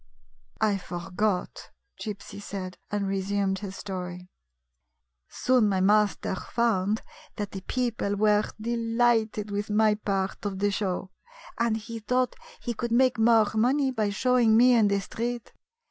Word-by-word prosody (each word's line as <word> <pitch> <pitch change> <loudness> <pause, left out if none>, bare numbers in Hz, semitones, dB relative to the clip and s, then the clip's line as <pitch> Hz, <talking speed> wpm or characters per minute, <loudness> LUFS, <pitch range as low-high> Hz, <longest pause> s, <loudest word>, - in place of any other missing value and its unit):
" - - -35
I 205 -2 +2
forgot," 180 +3 -3 0.3
Gypsy 205 -1 -6
said, 185 -2 -6
and 205 -1 -1
resumed 195 0 0
his 195 -2 -6
story: 180 -2 -6 0.5
" 60 +1 -54
Soon 250 -5 +4
my 190 -2 +1
master 205 +1 +2
found 215 0 0 0.3
that 205 -1 -4
the 190 - -6
people 230 -3 -1
were 210 0 +3
delighted 230 -2 +1
with 205 +1 -2
my 215 0 +4
part 195 -2 -2
of 200 -2 -3
the 205 +1 +1
show, 190 -2 -2 0.5
and 230 -1 +2
he 230 +1 -7
thought 250 +3 0 0.2
he 240 - -3
could 235 +1 -4
make 250 0 +3
more 225 -1 +5
money 260 +5 +2
by 220 -4 0
showing 235 +1 +3
me 250 +2 +6
in 225 -3 +5
the 200 0 +1
street. 235 +4 -4
210 Hz, 145 wpm, -27 LUFS, 195-230 Hz, 0.5 s, me